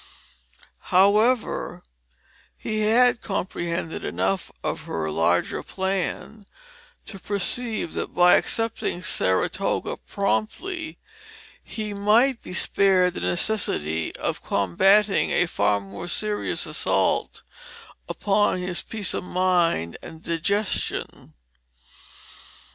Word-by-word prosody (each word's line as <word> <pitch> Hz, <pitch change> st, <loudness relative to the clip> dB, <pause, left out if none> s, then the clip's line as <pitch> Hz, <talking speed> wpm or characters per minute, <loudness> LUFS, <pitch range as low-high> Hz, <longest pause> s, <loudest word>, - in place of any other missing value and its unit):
However, 210 Hz, +6 st, +2 dB, 0.7 s
he 215 Hz, 0 st, -3 dB
had 230 Hz, +3 st, +3 dB
comprehended 170 Hz, -4 st, -3 dB
enough 95 Hz, +2 st, -2 dB
of -, -, -4 dB
her 80 Hz, -1 st, -3 dB
larger 85 Hz, +3 st, +1 dB
plan 195 Hz, +2 st, -4 dB, 0.6 s
to 195 Hz, -, -7 dB
perceive 205 Hz, 0 st, 0 dB
that -, -, -4 dB
by 180 Hz, 0 st, +6 dB
accepting 225 Hz, -5 st, 0 dB
Saratoga 95 Hz, -, 0 dB
promptly 315 Hz, -, -3 dB, 0.7 s
he 215 Hz, -2 st, -5 dB
might 225 Hz, +6 st, +2 dB
be 180 Hz, -, -8 dB
spared 185 Hz, -2 st, +3 dB
the -, -, -6 dB
necessity 80 Hz, -, 0 dB
of -, -, -3 dB
combating 195 Hz, -, +3 dB
a -, -, +2 dB
far 100 Hz, -10 st, +1 dB
more 100 Hz, -, -9 dB
serious 210 Hz, +3 st, 0 dB
assault -, -, 0 dB, 0.7 s
upon 205 Hz, -1 st, +1 dB
his 180 Hz, -1 st, -2 dB
peace 215 Hz, -3 st, 0 dB
of -, -, -3 dB
mind 175 Hz, -, 0 dB
and 160 Hz, 0 st, -11 dB
digestion. 200 Hz, +5 st, -2 dB
190 Hz, 95 wpm, -24 LUFS, 165-215 Hz, 0.7 s, by